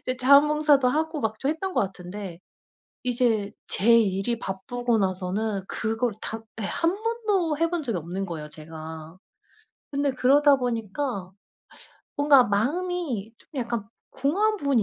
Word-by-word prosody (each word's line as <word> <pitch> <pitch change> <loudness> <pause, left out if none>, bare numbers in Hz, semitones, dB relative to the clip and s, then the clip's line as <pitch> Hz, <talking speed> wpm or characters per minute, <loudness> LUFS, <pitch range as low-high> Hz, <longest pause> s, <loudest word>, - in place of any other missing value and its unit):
이제 255 0 -3
자원봉사도 285 +1 +5
하고 315 +3 -1
막 220 -1 -2
좀 275 - 0
했던 365 +4 -3
것 - - +3
같은데 190 -1 -5 0.7
이제 235 -5 +1 0.2
제 230 +4 +4
일이 205 +2 0
바쁘고 235 +5 -2
나서는 195 +2 -1
그걸 225 +1 -1
다 225 0 -4 0.2
예 - - -3
1 335 - 0
번도 415 -9 0
해 330 0 +2
본 345 -2 -2
적이 230 -9 -2
없는 180 +5 -4
거예요, 155 -4 -6
제가. 160 +1 -9 0.7
근데 280 0 0
그러다 280 +3 +5
보니까 230 -4 -3 0.9
뭔가 285 -3 +6
마음이 250 - -1
좀 - - -26
약간 235 -4 -2 0.3
공허한 395 +11 +1
부분이 280 - +2
240 Hz, 270 characters per minute, -25 LUFS, 195-290 Hz, 0.9 s, 뭔가